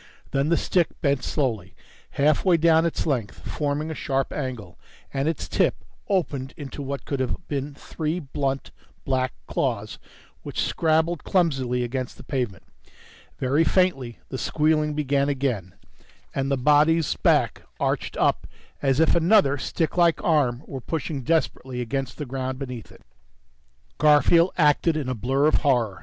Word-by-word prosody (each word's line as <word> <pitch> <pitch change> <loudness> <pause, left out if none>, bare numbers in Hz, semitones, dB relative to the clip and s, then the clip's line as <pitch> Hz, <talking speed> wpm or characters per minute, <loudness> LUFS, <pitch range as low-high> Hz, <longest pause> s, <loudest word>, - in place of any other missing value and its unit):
Then 140 +2 +1
the 170 - +3
stick 175 -4 0
bent 140 -3 +1
slowly 110 - -2 0.4
halfway 155 +5 +4
down 165 0 +4
its 165 - -3
length, 125 -10 -2
forming 150 +1 -2
a - - -2
sharp 135 -3 -2
angle, 120 -11 -5 0.3
and 135 +1 0
its 165 - -3
tip - - 0 0.2
opened 145 -8 -1
into 145 0 -7
what 140 0 -5
could 140 - -3
have 130 +7 -3
been 140 0 -3
three 155 +3 -3
blunt, 135 -2 -3 0.3
black 130 -1 0
claws - - -2 0.4
which - - -6
scrabbled 160 0 +1
clumsily 135 -9 +1
against 125 +1 -4
the - - -12
pavement. 125 -8 -3 0.7
Very 140 +5 +2
faintly, 155 -10 +1
the 130 - -4
squealing 150 -1 +1
began 140 -1 +1
again, 125 -10 -2 0.6
and 135 0 -1
the 140 - +1
body's 150 +3 +3
back - - +2 0.2
arched - - -1
up - - +1 0.3
as 135 0 +2
if 160 - +4
another 170 -4 +4
sticklike 170 +3 +1
arm 145 -8 +2
were 135 -2 -7
pushing 150 0 -3
desperately 130 -4 -1
against 125 +1 -3
the 150 - -4
ground 130 0 -4
beneath 125 -4 -7
it. - - -18 1.0
Garfield 160 +4 +5
acted 155 0 +3
in 140 -4 -3
a - - 0
blur 130 +5 +1
of 155 - +4
horror. 120 -9 +1
140 Hz, 150 wpm, -24 LUFS, 130-155 Hz, 1.0 s, Garfield